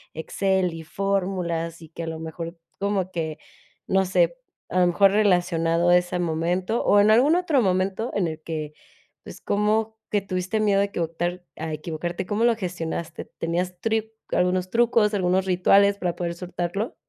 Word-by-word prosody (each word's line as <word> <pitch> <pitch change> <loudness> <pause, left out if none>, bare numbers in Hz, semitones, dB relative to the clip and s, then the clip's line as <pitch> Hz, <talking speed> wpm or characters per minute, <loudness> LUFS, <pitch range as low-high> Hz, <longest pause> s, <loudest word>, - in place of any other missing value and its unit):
Excel 190 +2 0
y 165 0 -7
fórmulas, 175 -2 -2
y 160 - -13
que 170 - -8
a 165 - -4
lo 160 0 -4
mejor 165 +1 -6 0.2
como 195 -2 -1
que, 160 -3 -3 0.5
no 190 0 +2
sé, - - +2 0.3
a 185 - +1
lo 180 - +5
mejor 195 +3 +4
relacionado 175 -4 +2
a 175 - +7
ese 180 0 -1
momento 175 +5 -1
o 205 - +5
en 210 +1 +5
algún 270 +9 +5
otro 330 -7 +2
momento 190 +4 0
en 200 - +1
el 160 -1 -6
que, 155 -2 -5 0.5
pues, - - -10
como 215 +2 0 0.2
que 205 - +3
tuviste 185 +2 -2
miedo 205 -2 +3
a - - +4
equivocar 175 -1 -3
a 160 0 -4
equivocarte, 170 +4 -4
¿cómo 210 +4 0
lo 235 -1 +4
gestionaste? 170 -4 -4
¿Tenías 175 +2 -3
tri 220 +1 -1 0.2
algunos 180 +1 +1
trucos, 230 -1 +3
algunos 185 0 +1
rituales 195 +2 +4
para 180 -3 -2
poder 170 -1 -3
soltarlo? 180 +4 -3
180 Hz, 170 wpm, -24 LUFS, 170-200 Hz, 0.5 s, a